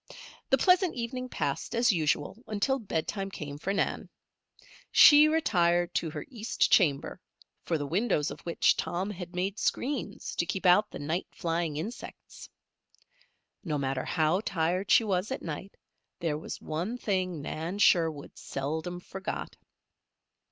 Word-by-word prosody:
The 270 Hz, -, +5 dB
pleasant 365 Hz, +4 st, +3 dB
evening 250 Hz, +1 st, -4 dB
passed 240 Hz, -, -3 dB
as 235 Hz, 0 st, +4 dB
usual 155 Hz, -1 st, 0 dB
until 220 Hz, +6 st, 0 dB
bedtime 195 Hz, -1 st, -3 dB
came 145 Hz, -6 st, -7 dB
for 195 Hz, -, -2 dB
Nan. 200 Hz, -, -1 dB, 0.8 s
She 300 Hz, 0 st, +9 dB
retired 175 Hz, -, +2 dB
to 165 Hz, -, 0 dB
her -, -, -6 dB
east 230 Hz, -4 st, -1 dB
chamber, 145 Hz, -8 st, +2 dB, 0.4 s
for 165 Hz, -, 0 dB
the 145 Hz, -, -3 dB
windows 165 Hz, -2 st, 0 dB
of -, -, -8 dB
which 170 Hz, -, +2 dB
Tom 185 Hz, +4 st, -2 dB
had 180 Hz, -2 st, -8 dB
made 190 Hz, +4 st, -2 dB
screens 255 Hz, -6 st, -2 dB
to 170 Hz, -, +1 dB
keep 190 Hz, +2 st, -3 dB
out 180 Hz, +4 st, +5 dB
the -, -, -8 dB
night 160 Hz, +5 st, -2 dB
flying 165 Hz, -2 st, -2 dB
insects. 210 Hz, +10 st, -8 dB, 1.1 s
No 155 Hz, -6 st, -1 dB
matter 135 Hz, -1 st, -1 dB
how 160 Hz, +3 st, +1 dB
tired 185 Hz, +1 st, -1 dB
she 230 Hz, -, +6 dB
was 195 Hz, -1 st, -1 dB
at 265 Hz, -, -4 dB
night 170 Hz, +5 st, -6 dB, 0.4 s
there 165 Hz, -4 st, -1 dB
was -, -, -7 dB
one 175 Hz, +10 st, -3 dB
thing 185 Hz, -7 st, -1 dB
Nan 160 Hz, +6 st, -4 dB
Sherwood 165 Hz, -7 st, +2 dB
seldom 160 Hz, +6 st, -4 dB
forgot. 190 Hz, +1 st, -6 dB
180 Hz, 145 wpm, -29 LUFS, 160-215 Hz, 1.1 s, She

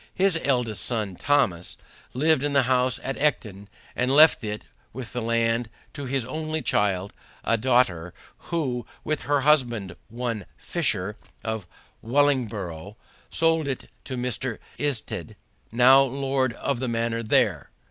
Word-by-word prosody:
His 190 Hz, -3 st, +3 dB
eldest 125 Hz, -6 st, 0 dB
son 110 Hz, -6 st, -2 dB
Thomas 90 Hz, -9 st, +1 dB, 0.4 s
lived 155 Hz, +2 st, +3 dB
in 145 Hz, 0 st, -1 dB
the 140 Hz, -1 st, +4 dB
house 125 Hz, 0 st, +1 dB
at 135 Hz, -, -3 dB
Ecton, 105 Hz, -9 st, -1 dB, 0.3 s
and 125 Hz, +1 st, +1 dB
left 150 Hz, 0 st, +7 dB
it 105 Hz, 0 st, -4 dB, 0.3 s
with 125 Hz, 0 st, -7 dB
the 125 Hz, -, -2 dB
land 115 Hz, 0 st, +1 dB, 0.2 s
to 140 Hz, -, -6 dB
his 135 Hz, -2 st, -1 dB
only 155 Hz, +3 st, -3 dB
child, 100 Hz, -1 st, 0 dB, 0.3 s
a 115 Hz, -, +2 dB
daughter, 110 Hz, -8 st, +2 dB, 0.4 s
who, 130 Hz, -8 st, -2 dB, 0.2 s
with 155 Hz, -1 st, -1 dB
her 145 Hz, -1 st, +3 dB
husband, 120 Hz, -, +2 dB
one 115 Hz, -2 st, -4 dB
Fisher, 105 Hz, -, -1 dB, 0.3 s
of 110 Hz, -1 st, -3 dB, 0.3 s
Wellingborough, 110 Hz, -, 0 dB, 0.3 s
sold 165 Hz, -2 st, +2 dB
it 135 Hz, -, -4 dB
to 130 Hz, -, -4 dB
Mr. 125 Hz, -1 st, -2 dB, 0.2 s
Isted, 140 Hz, -5 st, -3 dB, 0.4 s
now 125 Hz, +4 st, +7 dB
lord 135 Hz, -1 st, 0 dB
of 130 Hz, +1 st, -2 dB
the 130 Hz, -, -2 dB
manor 115 Hz, 0 st, -1 dB
there. 110 Hz, -, +2 dB
125 Hz, 135 wpm, -25 LUFS, 110-140 Hz, 0.4 s, left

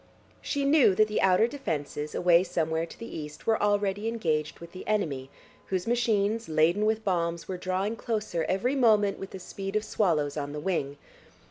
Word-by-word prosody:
She 285 Hz, -1 st, -1 dB
knew 280 Hz, -9 st, +5 dB
that 215 Hz, +2 st, +4 dB
the 215 Hz, -, -1 dB
outer 190 Hz, +3 st, +5 dB
defences, 150 Hz, -, -4 dB
away 175 Hz, 0 st, +5 dB
somewhere 165 Hz, -2 st, -1 dB
to -, -, -13 dB
the 230 Hz, -, -7 dB
east, 150 Hz, -2 st, -8 dB
were 225 Hz, -, +2 dB
already 205 Hz, 0 st, +1 dB
engaged 160 Hz, -10 st, -1 dB
with 170 Hz, 0 st, -11 dB
the 185 Hz, -, -10 dB
enemy, 150 Hz, -11 st, -1 dB, 0.4 s
whose 185 Hz, -2 st, -1 dB
machines, 225 Hz, -2 st, +1 dB
laden 165 Hz, +7 st, +3 dB
with 220 Hz, 0 st, 0 dB
bombs, 170 Hz, -3 st, -1 dB
were 185 Hz, -, -4 dB
drawing 185 Hz, +4 st, -1 dB
closer 215 Hz, -8 st, -2 dB
every 195 Hz, +8 st, +1 dB
moment 215 Hz, -7 st, +3 dB
with 195 Hz, -, -6 dB
the -, -, -8 dB
speed 195 Hz, +2 st, -6 dB
of 215 Hz, -, +1 dB
swallows 155 Hz, -9 st, 0 dB
on 145 Hz, -1 st, -3 dB
the 150 Hz, -, -4 dB
wing. 150 Hz, -4 st, -2 dB
190 Hz, 185 wpm, -28 LUFS, 165-215 Hz, 0.4 s, knew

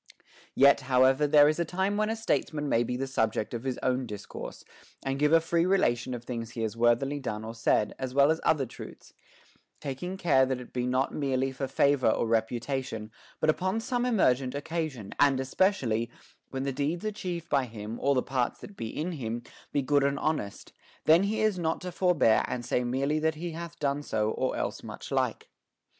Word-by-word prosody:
2. -, -, -20 dB, 0.4 s
Yet, 140 Hz, +1 st, +6 dB
however, 130 Hz, +3 st, +4 dB
there 145 Hz, 0 st, +7 dB
is 155 Hz, +2 st, +1 dB
a -, -, +3 dB
time 190 Hz, +4 st, -1 dB
when 215 Hz, +1 st, +1 dB
a 225 Hz, -, 0 dB
statesman 155 Hz, -9 st, -1 dB
may 115 Hz, -4 st, +2 dB
be 125 Hz, +1 st, -2 dB
the 135 Hz, -, -2 dB
subject 110 Hz, -5 st, -1 dB
of 115 Hz, 0 st, -4 dB
his 130 Hz, -2 st, -1 dB
own 130 Hz, 0 st, 0 dB
discourse, 105 Hz, -2 st, -8 dB, 0.4 s
and 135 Hz, 0 st, -1 dB
give 150 Hz, +1 st, +3 dB
a 165 Hz, -, +7 dB
free 165 Hz, +1 st, +1 dB
rela 185 Hz, -9 st, +3 dB
tion 125 Hz, +1 st, -5 dB
of 120 Hz, -, -8 dB
things 115 Hz, -2 st, -4 dB
he 115 Hz, -1 st, -4 dB
has 110 Hz, 0 st, -2 dB
worthily 120 Hz, +5 st, +2 dB
done 110 Hz, -5 st, -4 dB
or 115 Hz, -, -6 dB
said, 110 Hz, -2 st, +1 dB
as 130 Hz, -1 st, -3 dB
well 140 Hz, +3 st, +5 dB
as 160 Hz, -, -1 dB
other 145 Hz, -4 st, +2 dB
truths; 120 Hz, -, -11 dB, 0.7 s
taking 150 Hz, +7 st, -5 dB
care 150 Hz, -8 st, +4 dB
that 130 Hz, -1 st, -1 dB
it 125 Hz, -, -11 dB
be 125 Hz, 0 st, -1 dB
not 130 Hz, +2 st, 0 dB
merely 135 Hz, -2 st, 0 dB
for 135 Hz, +1 st, -4 dB
favor 135 Hz, -1 st, +3 dB
or 110 Hz, -, +1 dB
reputation, 115 Hz, 0 st, -2 dB, 0.3 s
but 155 Hz, -, +1 dB
upon 185 Hz, +7 st, +1 dB
some 245 Hz, +1 st, -1 dB
emergent 135 Hz, -, +2 dB
occasion, 150 Hz, -, -4 dB
and 140 Hz, -2 st, +5 dB
espec 140 Hz, +6 st, +1 dB
ially, 115 Hz, +1 st, 0 dB, 0.4 s
when 135 Hz, 0 st, -3 dB
the 135 Hz, -1 st, -2 dB
deeds 150 Hz, +8 st, -2 dB
achieved 180 Hz, -6 st, -4 dB
by 135 Hz, -2 st, +2 dB
him 110 Hz, -1 st, -7 dB
or 140 Hz, 0 st, +3 dB
the 125 Hz, -, +2 dB
parts 130 Hz, -3 st, -1 dB
that 205 Hz, -, -10 dB
be 115 Hz, -, -5 dB
in 155 Hz, +10 st, -3 dB
him 120 Hz, -6 st, -4 dB, 0.3 s
be 140 Hz, -, 0 dB
good 145 Hz, +1 st, +3 dB
and 140 Hz, 0 st, +1 dB
honest, 140 Hz, -10 st, -3 dB, 0.3 s
then 160 Hz, +3 st, +6 dB
he 215 Hz, +2 st, 0 dB
is 215 Hz, -4 st, +2 dB
not 160 Hz, -1 st, 0 dB
to 180 Hz, -, -6 dB
forbear 170 Hz, -11 st, +3 dB
and 120 Hz, -1 st, -4 dB
say 125 Hz, 0 st, 0 dB
merely 135 Hz, +5 st, 0 dB
that 160 Hz, 0 st, +1 dB
he 170 Hz, +2 st, -5 dB
hath 170 Hz, +1 st, -7 dB
done 140 Hz, 0 st, -1 dB
so 110 Hz, -6 st, -1 dB
or 130 Hz, -, -1 dB
else -, -, -3 dB
much -, -, -9 dB
like. -, -, -1 dB
135 Hz, 210 wpm, -28 LUFS, 125-160 Hz, 0.7 s, there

